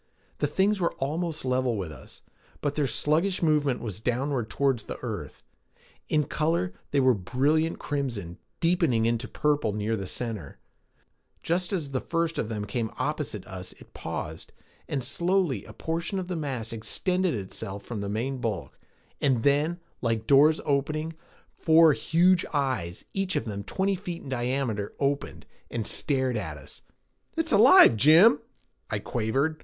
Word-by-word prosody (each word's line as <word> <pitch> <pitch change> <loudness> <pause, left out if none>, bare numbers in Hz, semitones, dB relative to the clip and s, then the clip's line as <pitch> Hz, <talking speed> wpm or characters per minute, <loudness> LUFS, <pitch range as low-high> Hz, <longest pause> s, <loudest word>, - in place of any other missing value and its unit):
The - - +2
things 200 +2 +2
were 170 - +1
almost 155 +2 -2
level 125 -2 +1
with 90 -5 -4
us, 75 - -13 0.4
but 145 -1 0
their 145 -2 0
sluggish 165 - +1
movement 150 -5 +2
was 105 -5 -5
downward 125 0 -1
toward 135 -2 +1
the - - -7
earth. - - -6 0.7
In 150 -1 +3
color, 150 - 0 0.2
they 145 - +2
were 130 -1 +5
a - - +2
brilliant 145 - +1
crimson, 115 -12 -4 0.2
deepening 165 - +2
into 115 +1 0
purple 145 -8 0
near 105 +2 -1
the 95 -3 -4
center. 110 - -4 0.9
Just 175 +3 0
as 160 -8 -2
the 130 - -1
first 165 -1 -1
of 110 - -2
them 105 -2 -3
came 110 +2 -2
opposite 140 -7 -3
us 90 -1 -8
it - - -18
paused, - - -6 0.4
and 135 -3 -2
slowly 170 - 0
a - - -11
portion 165 +4 -3
of 185 -2 -3
the 180 - -3
mass 130 -8 -4
extended 180 - -1
itself 100 0 -6
from 110 -4 -5
the 100 - -3
main 125 +6 -2
bulk; 100 - -4 0.4
and 130 -5 +2
then, 150 +5 +2 0.2
like 115 -2 0
doors 145 +4 +6
opening, 155 +3 0 0.4
four 160 -1 +5
huge 175 +3 +3
eyes, 130 - -1
each 195 -2 -1
of 145 - 0
them 100 -3 -4
twenty 195 - 0
feet 180 -3 -5
in - - -8
diameter, 120 -5 -2
opened 140 0 -1 0.2
and 115 -3 -3
stared 130 -1 0
at 80 -8 -4
us. 65 - -12 0.6
"It's - - 0
alive, - - +8
Jim," 155 - +7 0.5
I - - -1
quavered. 135 +7 -1
135 Hz, 160 wpm, -27 LUFS, 110-160 Hz, 0.9 s, alive